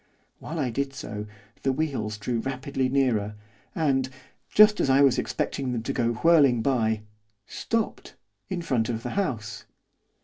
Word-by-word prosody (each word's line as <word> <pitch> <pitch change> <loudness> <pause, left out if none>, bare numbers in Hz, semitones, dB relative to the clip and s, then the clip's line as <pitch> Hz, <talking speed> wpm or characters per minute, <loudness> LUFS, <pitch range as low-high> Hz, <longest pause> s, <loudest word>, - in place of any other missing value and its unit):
While 165 - -6
I 135 -6 0
did 135 +3 -2
so, 105 -4 -6 0.3
the 135 - +1
wheels 130 -8 -2
drew 115 +3 -2
rapidly 135 +1 -2
nearer, 120 -6 +1 0.4
and, 135 -5 +1 0.4
just 210 0 +6
as - - +1
I 135 +1 +5
was 135 -2 +4
expecting 130 -2 -2
them 115 -2 -3
to 135 - -2
go 120 -3 +1
whirling 140 -3 +4
by, 110 -5 +1 0.4
stopped, 230 - -3 0.3
in 180 -3 -3
front 125 -8 0
of 115 -1 -3
the - - -4
house. 115 - -3
130 Hz, 150 wpm, -26 LUFS, 115-140 Hz, 0.4 s, just